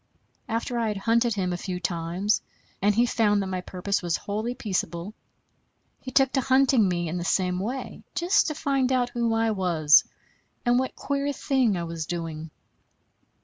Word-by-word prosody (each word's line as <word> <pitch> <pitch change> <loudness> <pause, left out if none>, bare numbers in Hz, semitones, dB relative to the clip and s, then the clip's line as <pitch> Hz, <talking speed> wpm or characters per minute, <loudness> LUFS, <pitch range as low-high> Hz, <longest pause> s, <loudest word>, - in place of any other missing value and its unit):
After 235 +1 -2
I 230 - 0
had 210 -2 -2
hunted 230 +2 +2
him 185 -3 -1
a - - -2
few 180 0 -4
times, 175 +4 -1 0.4
and 205 +1 +3
he 235 +2 +4
found 210 -4 +2
that 190 -1 -4
my 185 - -2
purpose 185 +2 -2
was 175 -2 0
wholly 215 +4 -3
peaceable, 185 -4 -3 0.9
he - - -8
took 265 +1 +3
to 265 - +1
hunting 260 -4 +4
me 175 -2 -1
in 175 +3 -3
the - - -3
same 180 +1 +1
way, 245 +7 -5
just 350 +3 +3
to 305 - -2
find 270 -2 0
out 250 -1 +2
who 235 -2 0
I 225 0 +2
was, 170 -7 +4 0.6
and 245 +1 +4
what 260 - -2
queer 280 0 -1
thing 260 -8 +1
I 170 - -3
was 165 -2 -5
doing. 165 -2 -5
210 Hz, 180 wpm, -26 LUFS, 180-245 Hz, 0.9 s, he